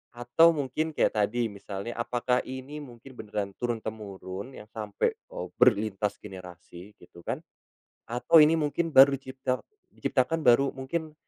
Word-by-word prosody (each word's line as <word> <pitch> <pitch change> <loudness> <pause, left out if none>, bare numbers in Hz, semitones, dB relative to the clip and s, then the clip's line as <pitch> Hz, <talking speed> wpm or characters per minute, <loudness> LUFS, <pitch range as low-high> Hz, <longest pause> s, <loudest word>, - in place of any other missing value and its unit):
Atau, 140 +8 +4
mungkin 150 +3 -2
kayak - - +2
tadi, 115 +2 0
misalnya, 100 +2 -6
apakah 125 +1 0
ini 130 +3 -7
mungkin 130 -2 -12
beneran 105 -2 -4
turun-temurun, 110 -1 -5
yang 105 - -11
sampai, 105 - -1
eee - - -8
,berlintas 105 -4 +3
generasi, 90 0 -11
gitu, 85 - -16
kan? - - -3 0.7
Atau, 125 +7 +5
ini 160 +2 +4
mungkin 160 +2 -1
baru 140 -1 +8
dicipta 130 -1 -3 0.3
diciptakan 155 +5 0
baru, 135 +1 +4
mungkin 155 +4 -4
120 Hz, 135 wpm, -28 LUFS, 105-140 Hz, 0.7 s, baru